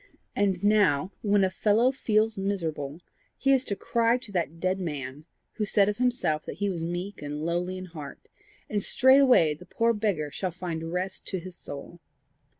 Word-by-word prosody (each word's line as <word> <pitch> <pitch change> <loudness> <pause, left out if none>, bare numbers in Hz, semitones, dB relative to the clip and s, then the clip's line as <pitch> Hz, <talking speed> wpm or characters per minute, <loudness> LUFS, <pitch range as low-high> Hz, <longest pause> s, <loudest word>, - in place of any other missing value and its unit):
And 195 -2 +1
now, 200 -6 +3
when 205 -2 +3
a 190 - +2
fellow 225 +6 +3
feels 220 -4 +2
miserable, 165 -6 -3 0.4
he 275 - +2
is 265 -1 +4
to 200 - -2
cry 230 +3 +2
to 245 -4 -10
that 165 -3 -2
dead 185 +2 0
man, 145 -4 -5 0.3
who 215 - 0
said 200 0 +3
of 210 - -2
himself 245 -11 +1
that - - -5
he 200 +1 0
was 170 -3 -4
meek 175 +4 -4
and 150 +1 -4
lowly 175 +2 -1
in 185 - -6
heart, 155 -5 -10 0.4
and 205 -1 -1
straightway 260 - +5
the 170 +4 -13
poor 230 +4 +2
beggar 200 -9 -1
shall 185 +5 -2
find 165 -2 -5
rest 185 +2 -3
to 190 - -2
his 180 +1 -9
soul! 145 +4 -9
185 Hz, 180 wpm, -27 LUFS, 165-210 Hz, 0.4 s, straightway